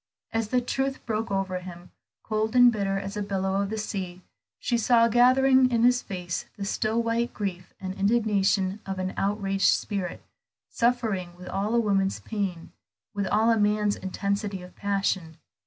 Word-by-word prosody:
As 225 -1 -1
the 250 +3 +1
truth 270 +2 -2
broke 225 0 -2
over 195 -2 -1
him, 180 -1 -11 0.3
cold 220 +1 -1
and 245 -1 +8
bitter 195 -3 -1
as 195 +1 -5
a 210 - -2
billow 195 -1 -1
of 200 - -2
the 220 - -3
sea, 185 -4 -5 0.3
she 240 - -1
saw 230 0 +4
gathering 255 +2 +5
in 235 -2 +1
his 245 +1 +4
face 180 -2 -4
the 200 - -4
still 220 +3 0
white 230 +1 -1
grief 185 -4 -4
and 185 -1 -4
indignation 200 -2 +1
of 195 0 -3
an 185 0 -3
outraged 195 -1 +1
spirit, 195 -4 -1 0.5
suffering 225 -7 0
with 180 - -11
all 205 +4 -1
a - - +4
woman's 195 -3 +1
pain, 195 -6 -4 0.4
with 200 -1 -2
all 220 +3 +3
a 225 - +2
man's 210 0 +2
intensity 200 0 -3
of 180 - -13
passion. 195 -5 -1
205 Hz, 170 wpm, -26 LUFS, 190-230 Hz, 0.5 s, and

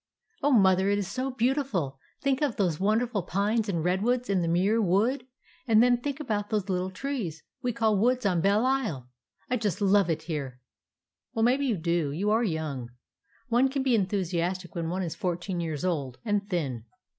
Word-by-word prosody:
"Oh, 290 - +3
Mother, 190 -6 +4
it 205 - +2
is 200 -3 -2
so 255 +7 -2
beautiful! 240 - -1 0.2
Think 275 0 +1
of 285 -6 +1
those 175 -6 0
wonderful 215 +2 +1
pines 205 +5 0
and 170 -5 -1
redwoods 220 +6 +1
in 190 -2 +2
the 170 - 0
Muir 190 +7 +2
Wood; 220 +8 +1 0.4
and 225 0 +6
then 245 -1 +4
think 285 +2 -3
about 210 -8 -2
those 210 -3 -1
little 185 0 0
trees 190 - -4 0.2
we 250 - 0
call 225 -2 +1
woods 250 +2 +2
on 180 -4 +2
Belle 205 +6 +3
Isle! 215 - -1 0.4
I 250 - 0
just 210 -7 -1
love 200 -2 +3
it 160 -1 -1
here." 140 -6 -4 0.8
"Well, 225 - +1
maybe 265 +4 +3
you 225 -6 +1
do; 170 -3 0
you 195 +8 0
are 225 +2 +3
young. 155 - -3 0.6
One 245 +3 +3
can 270 0 -1
be 260 -2 +2
enthusiastic 185 -3 -1
when 165 -3 -3
one 185 +2 -2
is 165 - -3
fourteen 175 0 -3
years 160 -1 -3
old, 140 -8 -2
and 205 -1 0
thin. 135 - -2
200 Hz, 190 wpm, -28 LUFS, 170-235 Hz, 0.8 s, and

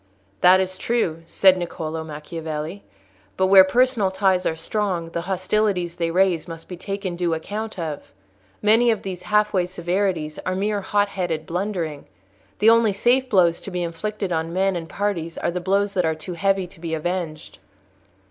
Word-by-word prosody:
"That 185 +1 +6
is 185 0 -2
true," 180 -9 0
said 190 +1 +5
Niccolò 160 -2 -4
Macchiavelli; 155 +3 -6 0.6
"but 190 - +3
where 190 0 +8
personal 240 0 +2
ties 190 -1 +1
are 160 - -1
strong, 180 -2 -2
the 170 - -2
hostilities 185 -2 0
they 170 -1 -2
raise 180 -1 +2
must 165 -1 -9
be 180 - -7
taken 195 0 -4
due 170 -2 0
account 210 +6 -5
of. 160 -4 -5 0.5
Many 225 +3 +5
of 220 -3 0
these 185 -2 -5
half 210 +3 +1
way 180 -2 +1
severities 180 -3 -2
are 185 - -2
mere 205 +1 -1
hot 205 +1 +1
headed 175 -5 -3
blundering. 175 -5 -3 0.5
The 220 +2 +6
only 230 -3 +4
safe 250 +6 +2
blows 175 -5 +3
to - - -6
be 180 -2 -2
inflicted 195 +4 -4
on 165 0 -1
men 190 +2 +1
and 165 -2 -5
parties 170 -4 -2
are - - -1
the 180 +1 -3
blows 200 +2 +1
that 180 - +1
are 160 0 +1
too 160 +3 -7
heavy 195 +1 +1
to 175 - -15
be 165 -1 -3
avenged." 165 -1 -4
185 Hz, 175 wpm, -23 LUFS, 165-200 Hz, 0.6 s, where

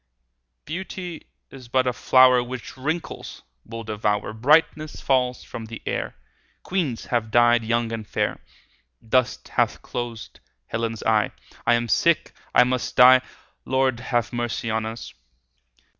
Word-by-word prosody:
Beauty 180 +1 -6 0.2
is 130 -3 -12
but 130 +2 +2
a 125 - +1
flower 130 +1 +5
15 120 0 -4
Which 130 -2 -7
wrinkles 160 +6 -5 0.2
will 115 0 -7
devour; 105 -1 -1
Brightness 150 +5 +2
falls 125 -2 +1
from 115 - -8
the 115 0 -8
air; - - -3 0.5
Queens 165 -11 -2
have 115 -3 -1
died 120 0 +4
young 115 +1 0
and 110 -2 -5
fair; - - -1 0.7
Dust 130 +2 +1
hath - - 0
closed 120 -2 -6 0.3
Helen's 115 - -3
eye; 110 -1 +2 0.3
I 120 - +6
am 120 0 -1
sick, 170 +7 +2 0.2
I - - +8
must 125 0 -2
die— 130 +1 +8
20 130 - -20 0.3
Lord, 130 -2 +1
have 120 -1 -1
mercy 120 -1 -2
on 110 0 -1
us! 115 +1 -7
120 Hz, 145 wpm, -24 LUFS, 115-130 Hz, 0.7 s, I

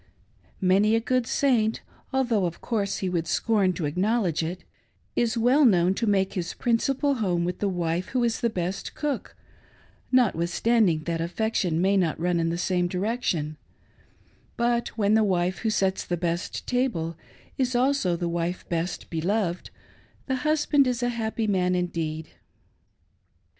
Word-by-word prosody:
Many 195 +4 +3
a - - +3
good 250 +1 0
Saint, 230 -6 +1 0.3
although, 240 -8 +1
of 170 - -7
course, 205 -4 -1
he - - +1
would 170 -2 -1
scorn 200 +2 +2
to 170 -2 -3
acknowledge 185 +2 0
it, 170 +3 -4 0.5
is 235 -1 +1
wtell 250 +6 +4
known 180 -1 +3
to 225 +4 -2
make 195 -2 +2
his 170 -2 -3
principal 270 +4 +1
home 180 -8 0
with 180 0 -3
the 205 - 0
wife 175 -1 -1
who 255 -2 0
is 230 -1 0
the 235 - +2
best 185 -2 -4
cook, 295 -4 -3 0.8
notwith 210 -10 +3
standing 200 -6 +2
that 165 0 -2
affection 180 -1 -1
may 195 +2 +3
not 170 -5 0
run 175 0 +1
in 165 0 +1
the 170 - -2
same 180 0 0
direction; 180 -6 -2 1.0
but 235 0 +1
when 205 -1 +2
the 220 0 +5
wife 180 -2 0
Vvho 225 - 0
sets 190 -2 0
the 175 - -2
best 170 +2 -3
table 235 -11 -1 0.4
is 255 -1 +1
also 250 -8 +2
the 170 0 -2
wife 170 +1 -3
best 170 +1 -2
beloved, 175 +2 -1 0.6
the 265 -1 -1
husband 295 -1 +2
is 245 -1 -1
a 245 - +2
happy 225 -1 -2
man 185 -3 +1
indeed. 160 -3 -3
195 Hz, 160 wpm, -26 LUFS, 175-235 Hz, 1.0 s, the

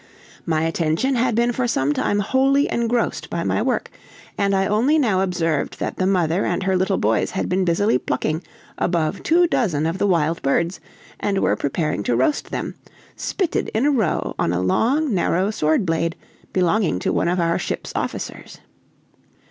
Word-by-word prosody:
My 160 -1 +1
attention 165 - 0
had 240 -2 +1
been 235 +1 +2
for 245 +1 -1
some 145 - +1
time 205 +6 0
wholly 270 +6 +2
engrossed 235 0 -1
by - - -2
my - - 0
work, - - -1 0.4
and 200 -1 +1
I 195 0 +2
only 240 +10 +2
now 215 -10 +2
observed 165 -5 -1
that - - -3
the 185 - +1
mother 180 -1 +1
and 175 +2 -1
her 190 0 +1
little 185 0 +1
boys 110 0 +1
had 190 - -2
been 185 +1 +1
busily 170 -4 +2
plucking 155 +5 -2 0.4
above 170 -3 0
two 350 +2 +4
dozen 180 - 0
of 165 +4 -2
the 205 - +2
wild 165 -3 +1
birds, 170 +6 0 0.4
and 200 -1 -1
were - - +2
preparing 150 - -1
to 120 - +1
roast 130 - 0
them, - - -4 0.4
spitted 370 -5 -2
in 230 +5 +2
a 295 - +4
row 220 - 0
on 85 - +1
a 90 - 0
long, 240 - +1
narrow 185 +2 +1
sword 155 0 +1
blade, 165 0 0 0.4
belonging 185 - +1
to - - -1
one - - +1
of 180 +1 +1
our 170 0 +1
ship's - - -4
officers. - - -5
185 Hz, 180 wpm, -21 LUFS, 165-230 Hz, 0.4 s, two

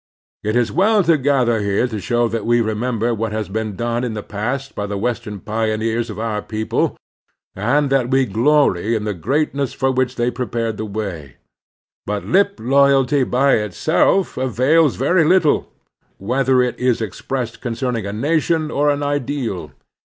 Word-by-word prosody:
It 110 +2 -1
is 120 -2 +2
well 205 +5 +3
to 165 -1 +4
gather 130 -5 +2
here 100 +3 +1
to 110 -3 -5
show 120 +4 +1
that 115 -1 -3
we 120 +2 +2
remember 115 +1 -1
what 110 0 -2
has 110 -2 -3
been 110 0 -3
done 120 +3 -2
in 120 -3 -3
the 105 - -5
past 125 +6 -4
by 105 - -4
the 100 0 -3
Western 115 -1 -3
pioneers 110 +2 -1
of 105 - -7
our 110 -1 -2
people, 110 0 -2 0.6
and 135 +8 +1
that 130 -3 +2
we 135 0 +3
glory 115 -2 +2
in 110 - -2
the 105 -1 -2
greatness 140 - -1
for 135 0 0
which 130 0 0
they 120 +1 0
prepared 115 -2 -3
the 110 - -4
way. 95 - -6 0.7
But 105 0 -3
lip 200 +2 +2
loyalty 135 +2 +3
by 135 +3 +3
itself 115 - +1
avails 130 +4 +2
very 165 +7 +2
little, 170 -1 +3 0.5
whether 130 +4 +2
it 125 - -3
is 125 -2 +1
expressed 115 +3 -4
con 120 -3 -3
cerning 115 -5 -2
a - - -4
nation 155 +6 0
or 145 0 +2
an 145 0 0
ideal. 145 -8 -2
120 Hz, 170 wpm, -19 LUFS, 110-140 Hz, 0.7 s, to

